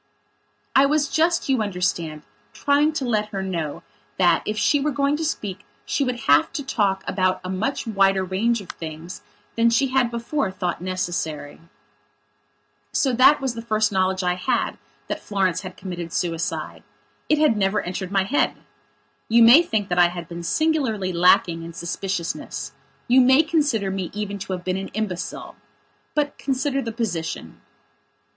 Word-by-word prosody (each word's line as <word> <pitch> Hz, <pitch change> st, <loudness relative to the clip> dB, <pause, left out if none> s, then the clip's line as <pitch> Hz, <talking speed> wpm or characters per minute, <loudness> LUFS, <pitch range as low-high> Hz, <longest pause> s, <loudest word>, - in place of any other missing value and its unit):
I 270 Hz, +1 st, +6 dB
was 295 Hz, 0 st, +2 dB
just, 335 Hz, +2 st, +1 dB
you 265 Hz, -4 st, +2 dB
understand, 180 Hz, -6 st, -2 dB, 0.3 s
trying 290 Hz, +2 st, +2 dB
to 290 Hz, -4 st, -2 dB
let 215 Hz, -3 st, 0 dB
her 195 Hz, -2 st, -4 dB
know 170 Hz, -6 st, -4 dB, 0.3 s
that, 175 Hz, -3 st, +4 dB
if 215 Hz, -, -2 dB
she 290 Hz, -, +3 dB
were 300 Hz, -, +1 dB
going 280 Hz, 0 st, +1 dB
to 320 Hz, -, -3 dB
speak 205 Hz, -, -3 dB, 0.2 s
she 280 Hz, -, 0 dB
would 250 Hz, -3 st, -2 dB
have 145 Hz, -3 st, +4 dB
to 300 Hz, -4 st, -3 dB
talk 200 Hz, -7 st, 0 dB
about 185 Hz, -1 st, +1 dB
a 185 Hz, -, -4 dB
much 220 Hz, +9 st, -2 dB
wider 195 Hz, -3 st, +2 dB
range 210 Hz, +5 st, 0 dB
of 185 Hz, -, -13 dB
things 160 Hz, +2 st, -8 dB, 0.3 s
than 230 Hz, 0 st, +4 dB
she 245 Hz, +4 st, +2 dB
had 255 Hz, -2 st, +2 dB
before 235 Hz, +1 st, -2 dB
thought 180 Hz, -3 st, -3 dB
necessary. 170 Hz, -5 st, -3 dB, 1.3 s
So 270 Hz, -, +1 dB
that 240 Hz, -, -2 dB
that 285 Hz, +3 st, +6 dB
was 265 Hz, -3 st, -1 dB
the 230 Hz, -, -6 dB
first 215 Hz, -2 st, +1 dB
knowledge 190 Hz, -1 st, +1 dB
I 180 Hz, 0 st, +2 dB
had 235 Hz, +7 st, -1 dB, 0.3 s
that -, -, -3 dB
Florence 190 Hz, -3 st, 0 dB
had 185 Hz, -1 st, -9 dB
committed 175 Hz, -3 st, -6 dB
suicide. 160 Hz, -, -3 dB, 0.5 s
It 305 Hz, -, +4 dB
had 300 Hz, -7 st, +3 dB
never 205 Hz, 0 st, +1 dB
entered 185 Hz, +1 st, -5 dB
my 195 Hz, -1 st, +2 dB
head. 255 Hz, +10 st, +1 dB, 0.7 s
You 230 Hz, +1 st, +6 dB
may 240 Hz, +8 st, +9 dB
think 220 Hz, -, -1 dB
that 175 Hz, 0 st, +1 dB
I 175 Hz, -, +7 dB
had 175 Hz, -1 st, -7 dB
been 170 Hz, 0 st, -7 dB
singularly 225 Hz, -, 0 dB
lacking 170 Hz, -1 st, +4 dB
in 165 Hz, 0 st, -8 dB
suspiciousness; 170 Hz, -5 st, -4 dB, 0.4 s
you 255 Hz, +2 st, +6 dB
may 260 Hz, +4 st, +6 dB
consider 285 Hz, -, 0 dB
me 190 Hz, -2 st, -3 dB
even 205 Hz, -1 st, -4 dB
to 190 Hz, 0 st, -4 dB
have 180 Hz, -1 st, -5 dB
been 185 Hz, 0 st, -1 dB
an 195 Hz, 0 st, -4 dB
imbecile. 200 Hz, -5 st, -4 dB, 0.6 s
But 290 Hz, -1 st, -1 dB
consider 275 Hz, 0 st, -1 dB
the 230 Hz, -, -4 dB
position. 175 Hz, -, -4 dB
200 Hz, 170 wpm, -23 LUFS, 180-255 Hz, 1.3 s, may